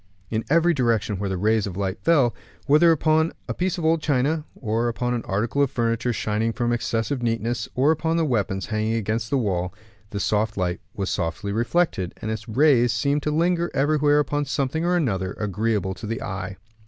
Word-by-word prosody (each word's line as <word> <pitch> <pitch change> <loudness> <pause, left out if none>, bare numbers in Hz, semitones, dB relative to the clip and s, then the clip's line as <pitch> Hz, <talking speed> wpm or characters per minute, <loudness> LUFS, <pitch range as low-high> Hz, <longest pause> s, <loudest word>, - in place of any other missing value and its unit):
In 110 0 -1
every 170 +3 +4
direction 115 - 0
where 100 -1 -2
the 95 - -2
rays 105 +2 +2
of 95 -2 -6
light 95 -1 -2
fell, 140 -8 +3 0.3
whether 155 +4 +6
upon 160 +1 +2
a - - -2
piece 185 0 -1
of 165 - -3
old 160 0 +3
china, 150 +2 +1
or 115 0 -1
upon 120 +2 -1
an 120 - -1
article 110 +8 0
of 140 - +3
furniture 115 0 0
shining 110 +1 -1
from 120 0 0
excessive 120 +3 -1
neatness, 115 0 -1
or 135 +5 +4
upon 160 +1 0
the 165 - +2
weapons 100 -8 -1
hanging 110 +1 -1
against 110 +1 -2
the 140 - +2
wall, 95 -6 -1 0.3
the 100 - -4
soft 105 +1 0
light 90 -2 -1
was 100 -1 -2
softly 85 +3 -2
reflected; 115 - 0
and 110 - -3
its 110 +1 -5
rays 125 -1 +4
seemed 140 +6 +1
to 150 - -1
linger 170 +2 +1
everywhere 145 +1 +3
upon 145 0 0
something 140 +3 -1
or 175 +1 +2
another, 95 - 0
agreeable 105 -1 -1
to 105 - -8
the 115 +1 -3
eye. 95 0 -5
115 Hz, 195 wpm, -24 LUFS, 105-145 Hz, 0.3 s, whether